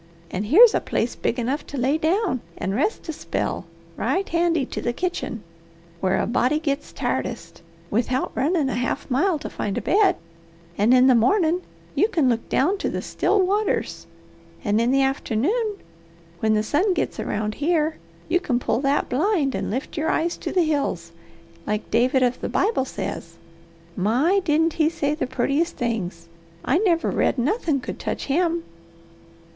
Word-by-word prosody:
And 200 +3 -3
here's 430 - +8
a - - +2
place 235 - -1
big 235 - -1
enough 255 +5 -1
to 285 - -6
lay 265 +4 +2
down 335 - +1 0.2
and 190 - -2
rest 300 - -1
a 320 - -3
spell - - -3 0.3
right 390 +1 -1
handy 335 -4 +1
to - - -5
the 240 - -1
kitchen, 350 - -3 0.6
where 190 +1 +1
a - - +1
body 255 +5 +1
gits 295 -2 -2
tiredest, - - -3 0.3
without 250 +4 0
runnin' 300 +1 +1
a 265 - -1
half 245 +2 -2
mile 335 +7 +2
to - - -6
find 200 - -3
a - - -1
bed, 400 0 +4 0.6
and 210 +6 +3
in 255 0 +6
the 260 - +6
mornin' 325 - +3 0.3
you 415 - +3
can 320 - +2
look 230 -1 -1
down 370 +9 +2
to - - -1
the - - -4
'still 400 -2 +1
waters'; 410 +2 -1 0.6
and 210 0 +2
in 235 - +2
the 270 +1 +3
afternoon, 295 - 0 0.6
when 220 +2 +2
the 215 - +1
sun 360 - +1
gits - - -2
around 210 0 -2
here, 310 +2 0 0.3
you 355 +2 +2
can 265 -9 0
pull 240 -1 0
that 280 +1 +1
blind 300 -1 +1
and - - -2
'lift 255 +6 -4
your 315 +1 0
eyes 335 +2 0
to - - -5
the 360 - +3
hills,' 280 - -1 0.6
like 210 0 -2
David 255 +4 +3
of 250 0 0
the - - -3
Bible 415 - +1
says. 170 -9 -6 0.6
My, 255 - +2
didn't 320 0 +2
he 310 -1 +2
say 295 -3 -1
the 305 -3 -2
purtiest 275 +6 0
things! 185 -8 -3 0.4
I 295 +7 +3
never 350 -5 +2
read - - +1
nothin' 300 - 0
could - - -6
touch - - -3
him!" 335 +3 +1
285 Hz, 175 wpm, -23 LUFS, 240-340 Hz, 0.6 s, here's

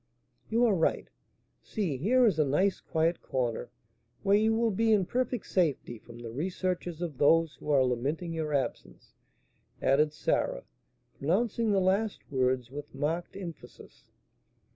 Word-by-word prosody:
"You 235 +2 +3
are 225 - +4
right; 165 -4 +1 0.5
see, 190 -10 -2
here 245 - +3
is 195 -8 +2
a - - +6
nice 180 +8 +1
quiet 165 +2 0
corner, 120 -2 -2 0.5
where 200 0 +4
you 220 +2 +3
will 230 0 +2
be 225 +3 +2
in 205 -4 +4
perfect 245 +1 -2
safety 145 - 0
from 120 +1 -13
the 120 -1 -8
researches 175 +3 -3
of 150 -6 -5
those 165 +2 +4
who - - -9
are 135 -3 +4
lamenting 140 +8 -2
your 160 -2 -3
absence," 140 -3 -3 0.7
added 150 +3 +3
Sarah, 150 - -1 0.6
pronouncing 215 - +1
the 200 - +3
last 195 +3 0
words 130 -2 0
with 145 0 -8
marked 160 +7 -2
emphasis. 170 - -10
165 Hz, 145 wpm, -29 LUFS, 140-200 Hz, 0.7 s, a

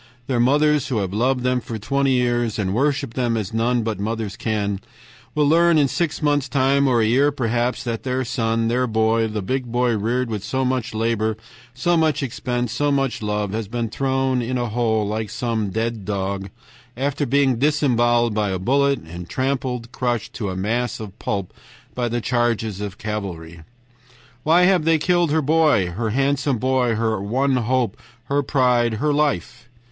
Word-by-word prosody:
Their 125 -2 -1
mothers, 150 +3 +3
who 125 - -1
have 95 -2 -2
loved 125 +4 +1
them 125 0 +1
for 115 - -6
twenty 135 +5 +1
years, 120 -3 +1
worshiped 130 +6 0
them 120 -3 0
as 105 -1 -4
none 120 +1 +1
but 110 -3 -3
mothers 110 -1 -3
can, 100 -3 -2 0.5
will 150 -1 +3
learn 170 +2 +4
in 145 -2 +4
six 160 +2 -2
months' 145 -2 +1
time, 140 0 +2
or 120 -3 +3
a - - +3
year 135 +6 +3
perhaps, 120 -2 -1
that 115 -2 -3
their 130 0 -2
son, 115 -1 0
their 125 +2 +1
boy, 110 0 +2
the 105 -2 -4
big 130 +5 -2
boy 120 -1 +2
reared 120 +4 0
with 105 -3 -4
so 130 +4 -1
much 125 -3 -1
labor, 110 -1 0 0.4
so 175 +8 +1
much 155 -3 +1
expense, 125 -2 -2
so 145 +4 0
much 135 -4 0
love, 105 -1 -2
has 110 0 -3
been 115 +1 -3
thrown 130 0 0
in 125 +2 -2
a 120 -1 -2
hole 110 -2 0
like 110 0 -3
some 115 -3 -2
dead 110 +1 -2
dog, 95 0 -3 0.5
after 140 +2 -1
being 135 -1 +2
disemboweled 120 -5 +2
by 105 -1 0
a 95 - -1
bullet, 140 +8 +2
and 85 +2 -9
trampled, 130 -3 -2
crushed, 120 -4 -2
to 105 -5 -3
a 95 - -4
mass 115 +6 -1
of 105 -2 -9
pulp 100 -3 -3 0.4
by 120 -1 -1
the 120 +1 -2
charges 115 -4 0
of 100 -1 -5
cavalry. 90 -6 -5 0.8
Why 165 +6 +4
have 180 -3 +4
they 165 0 +3
killed 175 +1 +2
her 155 +1 +1
boy, 150 - +3
her 110 +5 -2
handsome 135 +2 +1
boy, 125 -1 +1
her 110 -2 0
one 130 +6 +1
hope, 120 -2 0 0.3
her 140 +3 0
pride, 125 -4 +2
her 150 +7 0
life? 120 - -1
120 Hz, 180 wpm, -22 LUFS, 110-135 Hz, 0.8 s, learn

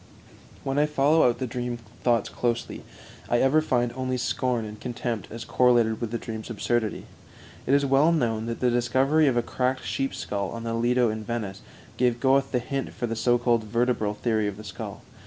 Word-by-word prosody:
When 135 +1 0
I 150 - +3
follow 150 -1 +4
out 120 - -1
the 130 - -2
dream 120 0 -3 0.2
thoughts 120 -4 +2
closely, 120 -1 -2 0.5
I 120 - +3
ever 135 +5 +4
find 120 -5 0
only 130 0 -2
scorn 125 -2 -1
and 105 0 -8
contempt 120 -4 -3
as 115 +1 -7
correlated 120 -3 +3
with 115 - -2
the 115 - -2
dream's 110 0 -7
absurdity. 115 0 -1 0.6
It 135 - +4
is 140 0 +3
well 140 +4 +4
known 115 -8 0
that 115 - -4
the 125 -1 +3
discovery 130 +6 +3
of 125 -3 +2
a 120 - +2
cracked 130 +2 -1
sheep's 135 - -2
skull 100 -2 -3
on 115 0 -6
the 115 0 -2
Lido 120 0 +2
in 110 0 -5
Venice 105 -3 -4 0.4
gave 120 -1 +2
Goethe 135 +1 +3
the 125 - +1
hint 135 +3 -3
for 120 - -3
the 115 -1 -3
so 120 +2 +3
called 120 -2 +1
vertebral 115 -2 0
theory 110 -1 0
of 100 -1 -4
the 110 - -9
skull. 105 - -7
120 Hz, 200 wpm, -26 LUFS, 115-130 Hz, 0.6 s, follow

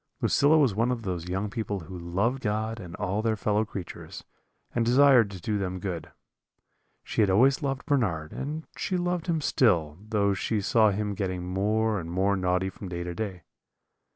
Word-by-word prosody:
"Lucilla 150 +3 +4
was 135 -8 +4
one 115 +5 +1
of 120 -2 -3
those 90 -3 -4
young 95 +3 -1
people 100 -2 -3
who 90 +3 -9
love 95 +9 -1
God 110 0 -2
and 85 -4 -8
all 100 +1 -1
their 110 0 +1
fellow 105 +1 +1
creatures, 95 -4 -8 0.5
and 120 - +1
desire 130 +1 +6
to 100 -3 -8
do 105 +4 -1
them 95 -1 -2
good. 85 -4 -5 0.9
She - - -1
had 105 - +4
always 130 +9 +4
loved 135 -2 -2
Bernard, 100 - 0
and 150 +4 -4
she 185 - -1
loved 175 -1 -1
him 165 -3 0
still, 85 - +2
though 105 -2 +1
she 105 +2 -1
saw 110 +2 +4
him 105 +1 -1
getting 90 -2 -3
more 105 +3 +1
and 85 -1 -6
more 95 +3 +1
naughty 90 0 0
from 95 - -9
day 85 -1 -4
to 90 0 -4
day. 95 -3 -5
105 Hz, 185 wpm, -27 LUFS, 90-115 Hz, 0.9 s, desire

